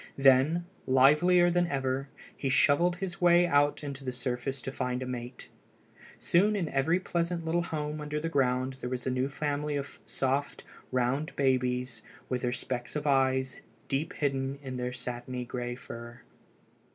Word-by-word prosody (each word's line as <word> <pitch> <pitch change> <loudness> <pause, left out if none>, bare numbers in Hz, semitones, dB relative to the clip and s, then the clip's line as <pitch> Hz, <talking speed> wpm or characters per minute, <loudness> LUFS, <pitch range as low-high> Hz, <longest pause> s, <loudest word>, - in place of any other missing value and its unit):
Then, 135 +5 +4 0.2
livelier 150 +7 +5
than 175 0 +2
ever, 135 -2 -1 0.3
he 135 - -2
shovelled 145 +6 +4
his 190 0 -5
way 175 0 +6
out 145 -3 +3
to 140 -2 -7
the 130 - -2
surface 125 +2 -3
to 135 - -5
find 125 -1 -2
a - - -4
mate. 125 0 -6 0.7
Soon 205 +5 +3
in 175 -6 -1
every 150 +6 +2
pleasant 170 -2 -2
little 170 +2 +1
home 150 -2 -3
under 150 0 -3
the 165 - -2
ground 130 -3 +1
there 125 - -3
was 125 -1 -4
a 130 - 0
new 130 +2 0
family 145 +1 -2
of 140 0 -5
soft, 135 +2 -1 0.3
round 130 +5 0
babies, 125 -3 0 0.3
with 125 -1 -1
their 125 - 0
specks 125 0 -4
of 150 0 -2
eyes 130 -2 +2 0.3
deep 140 +4 -1
hidden 135 -1 -1
in 130 -1 -5
their 125 0 -2
satiny 125 0 -5
gray 120 0 -4
fur. 120 0 -10
135 Hz, 165 wpm, -29 LUFS, 125-150 Hz, 0.7 s, way